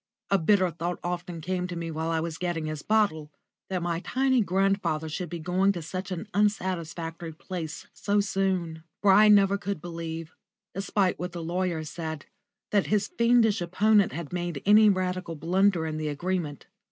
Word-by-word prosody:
A 195 - +4
bitter 185 +1 +3
thought 170 +2 -3
often 175 -1 -4
came 180 +2 -2
to 180 - -6
me 165 -1 -4
while 160 +1 -2
I 165 -1 +1
was 160 0 -4
getting 175 -3 -2
his 155 -1 -4
bottle 200 -8 +1 0.4
that 185 -2 -2
my 170 -1 -1
tiny 260 +5 +1
grandfather 190 -4 +1
should 170 +2 -4
be 170 - -4
going 185 +4 +1
to 170 -3 -5
such 185 +4 -5
an 185 +3 -5
unsatisfactory 170 -5 -1
place 160 -1 -6
so 205 0 0
soon. 185 -5 -1 0.2
For 200 - +6
I 210 +3 +7
never 200 -1 +5
could 200 -3 -3
believe, 165 -1 -6 0.4
despite 195 -1 0
what 180 0 -4
the 170 -1 -5
lawyers 170 -2 -2
said, 160 -3 -5 0.5
that 205 -2 +2
his 205 -1 +1
fiendish 235 -3 +3
opponent 200 +3 +3
had 160 +3 -6
made 175 -5 -3
any 210 +1 +7
radical 185 -3 -1
blunder 175 +2 +2
in 155 -1 -3
the 155 0 -2
agreement. 155 0 -3
180 Hz, 175 wpm, -27 LUFS, 165-195 Hz, 0.5 s, I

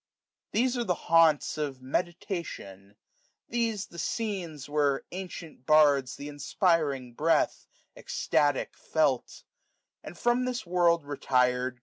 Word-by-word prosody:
These 250 +3 +1
are - - +1
the 180 -6 0
haunts 165 -3 +3
of 140 -3 -3
Meditation; 155 - -4 0.5
these 225 -4 -1
The 170 - -11
scenes 180 - -3
where 145 -2 +1
ancient 175 -7 -8
bards 145 -4 +4
th* 145 - -8
inspiring 145 - 0
breath, 165 +6 +1 0.3
Eztatic, 145 -2 0
felt; 145 -5 -1 0.6
and, 175 - -9
from 240 +1 +1
this 250 -4 -3
world 170 -2 +2
retir'd. 125 -3 0
155 Hz, 110 wpm, -28 LUFS, 135-180 Hz, 0.6 s, bards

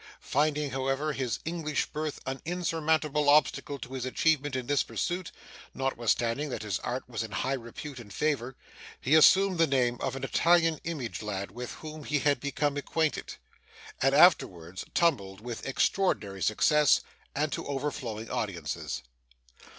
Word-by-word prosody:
Finding, 150 0 0
however, 135 +3 -1
his 130 -4 -2
English 160 -3 -1
birth 155 -1 -4
an 135 0 -4
insurmountable 160 -4 +1
obstacle 145 -1 +3
to 130 0 -9
his 130 -2 -3
advancement 145 +1 +1
in 130 -1 -2
this 145 +2 +2
pursuit 175 0 -3 0.4
(notwithstanding 125 +1 0
that 125 - -4
his 105 -4 -2
art 125 +2 -4
was 120 -2 -4
in 110 - -4
high 130 +4 -1
repute 130 +3 -7
and 110 -4 -11
favour), 130 0 -1 0.4
he 135 - 0
assumed 185 +3 +6
the 165 - +5
name 125 -3 +1
of - - -2
an 135 - -6
Italian 165 +2 +3
image 150 -9 -4
lad, 100 -2 -4
with 125 +1 -6
whom 155 -1 -9
he 150 +1 0
had 145 0 +2
become 145 0 -1
acquainted; 160 +2 -1 0.7
and 135 +1 +3
afterwards 95 - +4
tumbled 100 - +1
with 120 +2 -6
extraordinary 120 - 0
success, 150 - +4 0.3
and 150 +1 0
to - - -3
overflowing 135 -6 -3
audiences. 85 - -3
140 Hz, 150 wpm, -29 LUFS, 120-155 Hz, 0.7 s, assumed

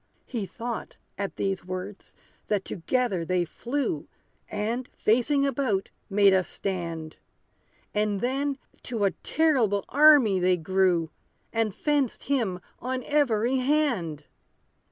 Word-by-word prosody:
He 220 -6 -4
thought, 230 +5 -6 0.2
at 200 -1 -4
these 195 -2 -1
words, 185 +2 -7 0.3
that 205 -2 0
together 200 -1 -1
they 180 +1 +1
flew, 240 - -3 0.4
And, 225 +4 -2
facing 255 +6 +2
about, 250 -8 0 0.2
made 200 -1 +5
a 190 -1 +4
stand; 170 -5 -4 0.8
And 210 -1 +1
then, 270 +4 -1 0.2
to 230 -4 -3
a 195 - +3
terrible 250 -11 +1
army 280 -9 +6
they 180 0 +3
grew, 175 -1 +1 0.4
And 225 -3 0
fenced 290 -5 0
him 230 -10 0 0.2
on 255 0 -3
every 260 -4 +2
hand. 250 - +1
210 Hz, 115 wpm, -27 LUFS, 185-260 Hz, 0.8 s, army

